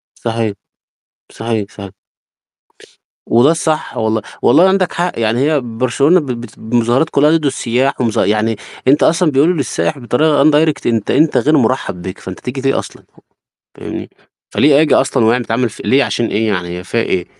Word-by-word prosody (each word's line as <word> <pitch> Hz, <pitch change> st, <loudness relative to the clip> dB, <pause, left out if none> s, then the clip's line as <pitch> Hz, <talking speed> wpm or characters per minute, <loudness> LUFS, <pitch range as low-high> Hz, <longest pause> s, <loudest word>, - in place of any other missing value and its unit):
صحيح، 115 Hz, -2 st, -2 dB, 0.8 s
صحيح، 110 Hz, -3 st, -3 dB
صحيح. 100 Hz, -2 st, -10 dB, 1.3 s
وده 125 Hz, +7 st, +4 dB
الصح 160 Hz, -2 st, -2 dB
والله، 110 Hz, 0 st, 0 dB, 0.2 s
والله 160 Hz, +8 st, +5 dB
وعندك 190 Hz, -1 st, +1 dB
حق 175 Hz, -5 st, -2 dB
يعني 115 Hz, +2 st, 0 dB
هي 150 Hz, +1 st, +2 dB
برشلونة 130 Hz, +8 st, +1 dB
ب 150 Hz, -, -6 dB
بت 120 Hz, -4 st, -7 dB
ب 110 Hz, +2 st, -9 dB
مظاهرات 120 Hz, +7 st, +2 dB
كلّها 150 Hz, +2 st, +3 dB
ضِد 150 Hz, -, -5 dB
السُياح 130 Hz, 0 st, -1 dB
ومظا 115 Hz, -3 st, +1 dB
يعني 110 Hz, +2 st, 0 dB, 0.3 s
أنت 140 Hz, +3 st, +4 dB
أصلًا 165 Hz, -1 st, +2 dB
بيقولوا 150 Hz, +7 st, +3 dB
للسائِح 145 Hz, +1 st, -2 dB
بطريقة 140 Hz, +4 st, +2 dB
undirect 155 Hz, 0 st, +2 dB
أنت 115 Hz, -3 st, 0 dB
أنت 160 Hz, 0 st, +2 dB
غير 155 Hz, +1 st, +3 dB
مرحب 110 Hz, -7 st, -1 dB
بك، 95 Hz, +1 st, -7 dB
فأنت 95 Hz, 0 st, -8 dB
تيجي 125 Hz, +2 st, -5 dB
ليه 135 Hz, +1 st, +1 dB
أصلًا، -, -, -10 dB, 0.7 s
فاهمني، -, -, -7 dB, 0.4 s
فليه 145 Hz, 0 st, +4 dB
آجي 155 Hz, -, +2 dB
أصلًا 125 Hz, -5 st, +2 dB
ويع 115 Hz, +2 st, +3 dB
بتعمل 120 Hz, 0 st, -1 dB
ف -, -, -14 dB
ليه 140 Hz, +1 st, +3 dB
عشان 120 Hz, -, -1 dB
إيه 110 Hz, +1 st, -1 dB
يعني 90 Hz, -4 st, -2 dB
هي 90 Hz, -, -9 dB
فيها 115 Hz, +5 st, -1 dB
إيه؟! 90 Hz, -4 st, -2 dB
125 Hz, 170 wpm, -15 LUFS, 110-150 Hz, 1.3 s, والله